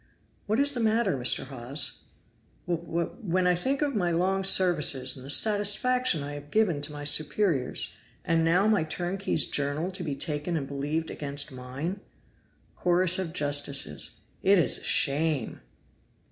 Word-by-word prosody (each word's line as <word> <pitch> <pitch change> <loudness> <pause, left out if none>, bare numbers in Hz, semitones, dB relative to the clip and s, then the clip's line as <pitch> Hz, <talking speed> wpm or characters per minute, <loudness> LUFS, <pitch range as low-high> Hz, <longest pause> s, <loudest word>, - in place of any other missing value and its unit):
"What 215 +4 0
is 285 +1 +3
the 255 - -5
matter, 225 -4 +1
Mr. 125 -1 +3
Hawes?" 135 +2 -4 0.7
"W 170 -1 -2
W 170 +1 -1
When 185 -3 0
I 180 - +4
think 265 - -1
of 285 -1 -1
my 185 -6 0
long 185 +3 0
services, 150 -9 +3
and 130 - -11
the 135 - -10
satisfaction 210 - +3
I 145 +1 -6
have 145 0 -9
given 180 -7 +1
to 145 - -4
my 145 0 -7
superiors 155 -1 0 0.3
and 165 0 +1
now 175 +4 +3
my 215 -5 +2
turnkey's 175 0 -1
journal 145 +5 -1
to 185 0 -5
be 150 -5 -3
taken 150 +4 -2
and 140 -3 -4
believed 145 +4 -3
against 145 0 -4
mine." 130 +9 -6 0.8
(Chorus 180 +1 +2
of 180 -4 -3
Justices.) 145 - 0 0.3
"It 195 +1 +4
is 170 - +2
a - - -16
shame!" 145 - +1
165 Hz, 160 wpm, -27 LUFS, 145-190 Hz, 0.8 s, I